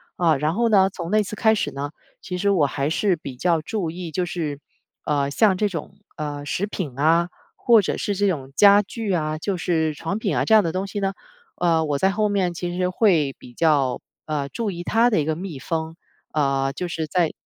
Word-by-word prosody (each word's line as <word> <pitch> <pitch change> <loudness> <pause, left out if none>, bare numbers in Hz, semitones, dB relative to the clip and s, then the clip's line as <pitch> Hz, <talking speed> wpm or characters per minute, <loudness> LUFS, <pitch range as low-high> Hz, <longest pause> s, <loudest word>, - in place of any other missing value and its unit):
啊， 165 -3 +3
然 150 +3 0
后 235 +5 +1
呢， 195 -3 +5
从 175 -2 -6
那 215 0 +4
次 205 - -6
开 220 -2 +4
始 - - -1
呢， 140 +1 -5 0.3
其 180 -1 -5
实 200 +3 +1
我 180 -7 +3
还 140 0 -1
是 185 +4 +1
比 140 -4 -8
较 170 +2 +1
注 180 +1 -3
意， 170 0 -6
就 180 +3 -1
是， 160 -5 -4 0.5
呃， 140 -2 +1
像 200 +4 +3
这 210 - +2
种， 165 -6 -6 0.2
呃， 145 -1 -4
食 185 +7 -2
品 150 -11 -5
啊， 165 +4 +3 0.3
或 230 -3 +5
者 195 - -2
是 205 - -2
这 205 +1 +2
种 140 -8 -2
家 200 +6 +7
具 210 0 -4
啊， 155 -2 -1
就 190 +5 -2
是 160 -3 0
床 165 +7 -4
品 - - -1
啊 - - +2
这 220 - +2
样 215 - +8
的 165 -4 -2
东 185 +1 -1
西 205 - -4
呢， 195 -1 -1 0.4
呃， 165 -2 +2
我 145 -2 0
在 190 +7 +3
后 210 +2 +1
面 195 -4 0
其 175 +1 -4
实 180 0 +1
会 175 - +2
比 120 - -13
较， 140 -5 +2 0.2
呃， 145 -3 -2
注 215 - -3
意 175 -1 -6
它 230 +6 +3
的 210 -9 +2
一 - - 0
个 155 +1 -1
密 180 -4 -6
封。 160 +3 -3 0.4
呃， 135 -2 +1
就 180 +6 -4
是 160 -2 -3
在 170 +1 +1
170 Hz, 245 characters per minute, -23 LUFS, 150-195 Hz, 0.5 s, 样